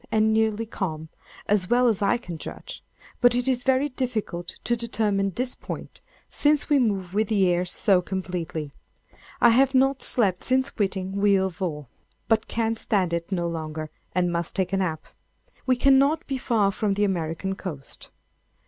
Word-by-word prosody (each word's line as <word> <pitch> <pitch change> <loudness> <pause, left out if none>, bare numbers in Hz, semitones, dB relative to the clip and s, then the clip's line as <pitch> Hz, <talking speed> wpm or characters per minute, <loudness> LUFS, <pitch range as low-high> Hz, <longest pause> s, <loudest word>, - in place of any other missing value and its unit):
and 220 0 +3
nearly 220 0 +1
calm, 160 -8 -4 0.4
as 200 -3 +1
well 245 +1 +4
as 220 -4 +1
I 205 +4 +3
can 175 -8 -8
judge—but 245 - -3
it 245 +1 0
is 255 -2 +1
very 265 +2 +2
difficult 220 -10 -3
to 240 - +1
determine 210 -4 0
this 250 +6 -2
point, - - -8 0.3
since 300 0 +1
we 285 - +5
move 195 -7 0
with 215 +1 +1
the 200 -3 +2
air 175 0 +1
so 185 +1 +2
completely. 175 -5 -4 0.7
I 240 - +6
have 265 +3 +4
not 270 +1 +3
slept 195 -7 +1
since 260 +1 +1
quitting 195 -1 -2
Wheal 195 -2 +3
Vor, 165 -5 -4 0.4
but 220 -1 +2
can 225 -1 0
stand 200 -6 +1
it 170 +2 -3
no 175 -2 0
longer, 155 -2 -5 0.2
and 180 -1 +2
must 170 -1 -3
take 190 -1 -1
a - - +2
nap. 165 -5 -2 0.6
We 255 - +4
cannot 275 +6 +3
be 270 -2 -3
far 215 -6 +2
from 200 0 -1
the 205 - +1
American 180 -1 -1
coast. 160 -8 -8
200 Hz, 165 wpm, -25 LUFS, 180-240 Hz, 0.7 s, I